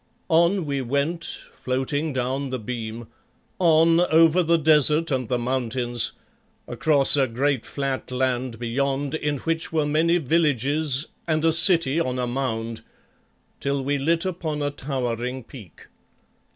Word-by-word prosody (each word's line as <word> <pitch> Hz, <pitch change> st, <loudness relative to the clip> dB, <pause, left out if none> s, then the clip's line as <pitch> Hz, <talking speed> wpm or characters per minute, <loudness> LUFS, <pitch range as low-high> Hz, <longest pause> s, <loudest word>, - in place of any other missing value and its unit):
On 170 Hz, +2 st, +2 dB
we 140 Hz, -2 st, -2 dB
went, 140 Hz, +7 st, -2 dB
floating 135 Hz, +4 st, -3 dB
down 130 Hz, +1 st, -2 dB
the 130 Hz, -, -3 dB
beam 115 Hz, 0 st, -6 dB, 0.5 s
on 165 Hz, -1 st, +4 dB
over 165 Hz, 0 st, +4 dB
the 170 Hz, 0 st, +2 dB
desert 155 Hz, 0 st, +3 dB
and 130 Hz, -4 st, -2 dB
the 125 Hz, -, 0 dB
mountains, 120 Hz, -1 st, -1 dB, 0.5 s
across 135 Hz, +4 st, +6 dB
a 135 Hz, -2 st, +2 dB
great 130 Hz, +2 st, -1 dB
flat 135 Hz, -2 st, -4 dB
land 125 Hz, -2 st, -2 dB
beyond, 135 Hz, +4 st, -2 dB
in 150 Hz, -2 st, -2 dB
which 165 Hz, +3 st, -3 dB
were 155 Hz, -2 st, 0 dB
many 160 Hz, +4 st, +2 dB
villages 150 Hz, -2 st, 0 dB, 0.2 s
and 155 Hz, -1 st, 0 dB
a 165 Hz, -, +3 dB
city 170 Hz, -4 st, +4 dB
on 130 Hz, -5 st, -2 dB
a 125 Hz, -, -1 dB
mound, 115 Hz, -3 st, -3 dB, 0.8 s
till 140 Hz, -1 st, -2 dB
we 140 Hz, +1 st, -1 dB
lit 165 Hz, +5 st, 0 dB
upon 160 Hz, -5 st, -3 dB
a 145 Hz, -, -1 dB
towering 125 Hz, -2 st, -4 dB
peak. 110 Hz, -, -14 dB
140 Hz, 140 wpm, -23 LUFS, 125-160 Hz, 0.8 s, across